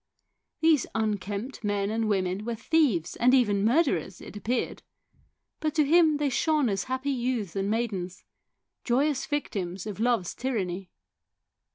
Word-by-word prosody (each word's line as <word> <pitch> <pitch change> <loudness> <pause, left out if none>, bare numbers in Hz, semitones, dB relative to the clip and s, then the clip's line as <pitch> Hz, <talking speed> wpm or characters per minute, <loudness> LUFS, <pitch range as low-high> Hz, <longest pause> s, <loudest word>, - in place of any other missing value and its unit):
These 320 -5 +4
unkempt 210 +3 -2
men 205 0 0
and 225 0 0
women 190 0 0
were 235 +1 -3
thieves 240 - +1
and 250 +2 +5
even 205 -6 +3
murderers, 225 - +1
it - - -11
appeared; 235 +4 -2 0.8
but 310 0 -2
to 305 -2 +4
him 315 0 +5
they 290 -1 +1
shone 300 -1 +2
as 195 -2 -1
happy 260 +2 -2
youths 240 -8 -2
and 195 0 -1
maidens, 200 -5 -2 0.6
joyous 270 +3 +1
victims 195 -11 -3
of 210 -2 -6
love's 230 -6 +1
tyranny. 195 -8 -3
225 Hz, 140 wpm, -27 LUFS, 195-270 Hz, 0.8 s, and